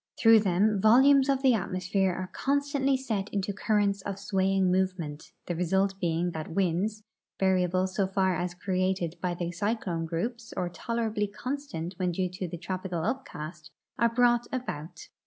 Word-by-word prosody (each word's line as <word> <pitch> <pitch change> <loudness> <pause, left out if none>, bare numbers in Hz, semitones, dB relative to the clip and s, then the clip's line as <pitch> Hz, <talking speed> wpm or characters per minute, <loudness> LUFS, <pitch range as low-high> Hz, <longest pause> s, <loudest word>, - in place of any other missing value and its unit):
Through 225 -2 +7
them 200 +1 +2
volumes 265 +5 +6
of 270 0 +1
the 260 -2 +6
atmosphere 190 -1 0
are 185 +1 -5
con 280 +2 +1
stantly 275 -1 +1
set 215 -6 -3
into 200 0 -2
currents 205 -1 +1
of 195 0 -5
swaying 195 -1 +1
movement, 180 -5 -2
the 175 - -3
result 190 +3 +1
being 175 0 0
that 160 -2 -5
winds 195 +4 0 0.4
(variable 185 -1 +2
so 190 +1 -1
far 190 -1 +1
as 175 0 -3
created 185 -2 -1
by 180 -1 -1
the 175 0 -3
cyclone 175 -3 -2
groups 230 +8 -4
or 180 -1 -1
tolerably 220 +3 -2
constant 215 - -5
Avhen 180 -1 0
due 185 +1 -1
to 180 +1 -5
the 175 +1 -6
tropical 180 -1 -4
upcast) 175 - -5 0.3
are 235 - +4
brought 240 0 +3
about. 185 - -5
190 Hz, 160 wpm, -28 LUFS, 180-225 Hz, 0.4 s, Through